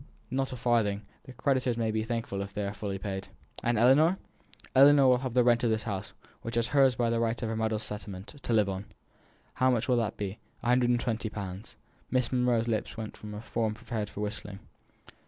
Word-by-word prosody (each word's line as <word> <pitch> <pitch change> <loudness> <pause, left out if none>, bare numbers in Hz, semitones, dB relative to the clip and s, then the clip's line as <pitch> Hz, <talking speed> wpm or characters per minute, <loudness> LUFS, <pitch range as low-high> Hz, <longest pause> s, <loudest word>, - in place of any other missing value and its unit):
"Not 135 +1 -1
a - - -4
farthing. 115 -4 +1 0.2
The 130 - -10
creditors 130 -2 +1
may 115 -1 0
be 110 0 0
thankful 115 -4 -3
if 100 0 -7
they 105 -1 -1
are 100 - -3
fully 100 -2 -4
paid." 95 -1 -5 0.3
"And 120 -1 +1
Ellinor?" 145 - +5 0.6
"Ellinor 140 +1 +8
will 125 -1 +5
have 130 -2 -4
the 125 - +5
rent 120 0 +3
of 120 - +3
this 110 -1 0
house, 100 -4 -4 0.3
which 115 +1 -4
is 115 0 +2
hers 135 -3 +4
by 115 0 +1
right 115 0 0
of 115 - -1
her 115 - -2
mother's 110 -1 -1
settlement, 100 -2 -7
to - - -3
live 105 -3 +4
on." 95 +1 -4 0.7
"How 130 - +2
much 120 -3 +1
will 125 -2 +3
that 110 -2 -1
be?" 100 +1 -4 0.2
"One 120 - +1
hundred 125 -1 +3
and 120 -1 +3
twenty 115 -1 -2
pounds." 100 0 -7 0.3
Miss 130 -2 +1
Monro's 125 -2 +2
lips 110 0 -2
went 110 -1 -6
into 105 0 -7
a - - -6
form 110 -2 -1
prepared 110 -2 -4
for 105 - -7
whistling. 105 -1 -5
115 Hz, 215 wpm, -29 LUFS, 105-125 Hz, 0.7 s, Ellinor